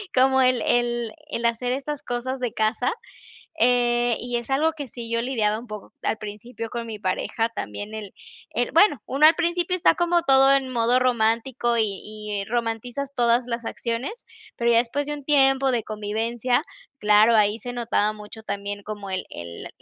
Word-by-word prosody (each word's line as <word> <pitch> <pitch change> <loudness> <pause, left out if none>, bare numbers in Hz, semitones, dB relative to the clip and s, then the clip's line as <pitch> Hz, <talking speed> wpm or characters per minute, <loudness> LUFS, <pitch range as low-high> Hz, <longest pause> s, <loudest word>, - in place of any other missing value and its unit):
como 265 +1 +4
el 255 -1 +3
el 240 -1 0 0.2
el 235 -5 -3
hacer 235 +2 0
estas 280 +2 -4
cosas 250 +2 -3
de 245 -3 -2
casa. 220 +4 0 0.7
Eh, 240 -1 +3
y 245 0 -3
es 240 +2 -5
algo 305 +4 +2
que 290 -4 -7
sí 235 0 -8
yo 230 0 +1
lidiaba 220 -4 0
un 240 - -13
poco 210 -1 -9
al 220 - -1
principio 220 +2 -7
con 235 -1 -4
mi 220 -1 -6
pareja 210 +3 -1
también, 205 - -6
él 210 -3 -7 0.4
él - - -1
bueno 395 - +5
uno 280 +3 +4
al 315 +1 +6
principio 350 +1 +1
está 365 - +4
como 345 0 +2
todo 270 -3 +6
en 270 -1 +2
modo 240 +1 +3
romántico 240 0 +1
y 225 - +4 0.2
y 210 -1 -5
romantizas 240 +4 -3
todas 240 -1 +2
las 235 0 -3
acciones, 250 - -4 0.3
pero 235 0 +1
ya 230 - +5
después 250 +5 0
de 295 - -2
un 290 - -8
tiempo 270 -2 +4
de 235 -3 0
convivencia, 225 +5 -1 0.3
claro, 210 +1 +5
ahí 210 0 +3
se 245 - -6
notaba 230 -3 0
mucho 215 +1 -11
también, 200 0 -4
como 205 -1 -7
el 185 0 -2
el 85 0 -8
240 Hz, 180 wpm, -24 LUFS, 220-265 Hz, 0.7 s, al